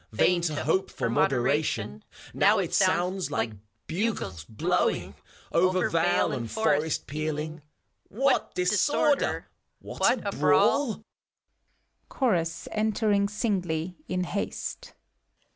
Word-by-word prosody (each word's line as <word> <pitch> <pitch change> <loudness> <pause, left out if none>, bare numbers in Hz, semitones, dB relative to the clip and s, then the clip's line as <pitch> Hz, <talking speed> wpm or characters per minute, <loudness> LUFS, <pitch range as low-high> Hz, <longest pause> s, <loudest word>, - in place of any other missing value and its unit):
Vain 175 +11 +3
to 155 -4 -2
hope 160 +7 +1
for 115 - -2
moderation; 120 - 0 0.3
Now - - +4
it - - -2
sounds 180 +2 +1
like 115 - -1 0.3
bugles 165 - -2
blowing, 110 - 0 0.4
Over 185 +2 +2
vale 170 0 +2
and 120 -5 -4
forest 155 -7 0
pealing: 155 +1 -4 0.5
What 265 +5 0
disorder! 210 +10 +1 0.3
What - - 0
a - - -1
brawl 280 -5 +3
f - - -12 1.1
CHORtJS 170 - 0
(entering 215 -1 +1
singly, 185 -6 -2
in 180 0 -1
haste). 200 +3 -5
175 Hz, 105 wpm, -27 LUFS, 150-200 Hz, 1.1 s, Now